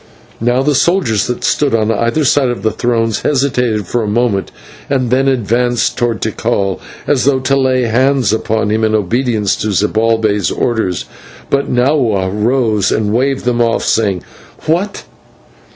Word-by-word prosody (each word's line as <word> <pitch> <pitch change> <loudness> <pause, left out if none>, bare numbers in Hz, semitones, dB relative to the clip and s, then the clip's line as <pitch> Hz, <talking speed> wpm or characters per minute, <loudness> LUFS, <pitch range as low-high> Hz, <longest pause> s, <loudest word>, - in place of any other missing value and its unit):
Now 120 +3 +1
the 150 +1 +2
soldiers 140 - +1
that 125 - -4
stood 140 -5 +1
on 110 0 +1
either 115 +7 0
side 135 +1 +3
of 120 - -4
the 110 - +1
thrones 115 -3 -1
hesitated 125 -7 0
for 120 +7 -1
a 110 - -2
moment, 105 -2 0 0.4
and 130 -4 0
then 135 +2 +2
advanced 120 -1 +1
towards 120 -2 -1
Tikal 110 -3 -1 0.3
as 140 -4 +1
though 140 -1 +3
to 135 +1 +1
lay 130 -2 +2
hands 125 0 +2
upon 110 -1 -1
him 110 +1 0
in 110 0 +2
obedience 110 0 0
to - - -3
Zibalbay's 110 -1 +1
order. 110 -6 -1 0.6
But 140 0 0
Nahua 125 -7 +1
rose 110 -2 +1
and 105 -1 0
waved 135 +2 0
them 120 -1 +1
off, 115 -1 +1
saying: 100 -5 0 0.4
"What! 175 +6 -1
120 Hz, 155 wpm, -14 LUFS, 110-130 Hz, 0.6 s, side